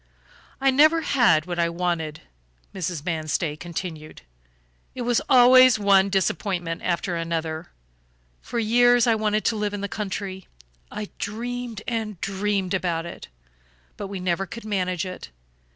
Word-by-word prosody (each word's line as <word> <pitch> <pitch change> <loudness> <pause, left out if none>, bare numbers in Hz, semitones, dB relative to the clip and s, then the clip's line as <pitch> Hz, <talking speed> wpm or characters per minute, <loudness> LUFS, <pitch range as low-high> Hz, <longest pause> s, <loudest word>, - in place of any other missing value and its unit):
"I 270 0 +3
never 310 +5 +5
had 235 - +3
what 175 -1 -4
I 170 0 +2
wanted," 170 -3 -2 0.5
Mrs. 175 -4 -4
Manstey 155 -2 -1
continued. 165 - -7 0.7
"It 250 - -4
was 240 -1 +1
always 255 -1 +7
one 200 -1 +4
disappointment 180 -3 -1
after 175 0 -1
another. 165 -1 -3 0.7
For 240 - -6
years 240 +1 +4
I 235 - +4
wanted 215 -1 0
to 230 - +2
live 210 -1 -2
in 200 - -5
the 200 - -2
country. 195 -2 -5 0.4
I 210 -1 -6
dreamed 235 +1 -5
and 220 -5 -3
dreamed 195 -1 -1
about 170 -3 -1
it; 170 - -9 0.7
but 200 - -6
we 195 -1 -6
never 180 +1 -1
could 230 +4 -9
manage 185 -4 -1
it. 185 - -8
195 Hz, 140 wpm, -24 LUFS, 170-225 Hz, 0.7 s, always